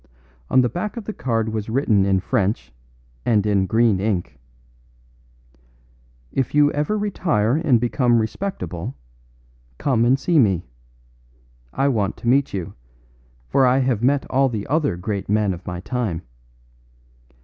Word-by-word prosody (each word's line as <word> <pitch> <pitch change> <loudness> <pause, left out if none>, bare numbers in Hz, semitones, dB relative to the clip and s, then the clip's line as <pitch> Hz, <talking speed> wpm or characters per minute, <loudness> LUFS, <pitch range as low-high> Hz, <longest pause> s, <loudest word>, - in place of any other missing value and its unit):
On 130 - +5
the 125 - +2
back 200 - -4
of 225 - -6
the 215 - -4
card 115 - -1
was 110 -1 -4
written 110 -6 +2
in 95 -1 +2
French 95 - -1 0.5
and 110 -4 +2
in 100 -2 +2
green 110 -3 +3
ink: 90 -9 -2 1.9
"If 135 +1 -2
you 145 0 +5
ever 150 +9 -1
retire 160 - 0
and 145 -7 +3
become 120 0 +2
respectable, 110 - -3 0.8
come 125 -5 +1
and 125 +3 +4
see 165 +3 +2
me. 95 -8 +2 1.1
I 135 - 0
want 105 -7 0
to - - -7
meet 135 +3 +3
you, 95 -4 -5 0.7
for 135 - +2
I 125 +1 +3
have 130 -5 +1
met 140 +3 +2
all 135 +1 +2
the 110 -4 -4
other 145 - 0
great 100 +1 -4
men 105 -2 +2
of 90 +1 -11
my 90 0 -4
time. 105 -7 -3
115 Hz, 145 wpm, -22 LUFS, 100-135 Hz, 1.9 s, On